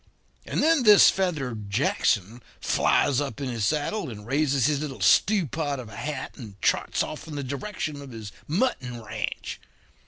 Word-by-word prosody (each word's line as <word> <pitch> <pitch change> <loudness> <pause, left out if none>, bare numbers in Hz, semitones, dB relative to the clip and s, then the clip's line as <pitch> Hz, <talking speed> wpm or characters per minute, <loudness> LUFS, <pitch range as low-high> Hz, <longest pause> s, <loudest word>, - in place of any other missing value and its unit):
And - - 0
then 325 -2 +4
this 210 -4 +8
feathered 135 - -2
Jackson 110 -1 0 0.2
flies 140 -1 +2
up 140 -1 -4
in 135 -2 -3
his 115 -4 -1
saddle 155 - -1
and 105 -3 -9
raises 140 0 +1
his 150 -1 +2
little 145 -3 -5
stewpot 160 - +2
of 120 -4 -8
a 105 - -11
hat, 145 0 -5
and 105 -7 -10
trots - - +1
off 155 +1 -7
in 155 - -7
the 140 - -3
direction 145 +2 -4
of 140 - -10
his 110 -4 -8 0.2
mutton 145 - -1
ranch. 110 - -5
140 Hz, 165 wpm, -26 LUFS, 120-155 Hz, 0.2 s, this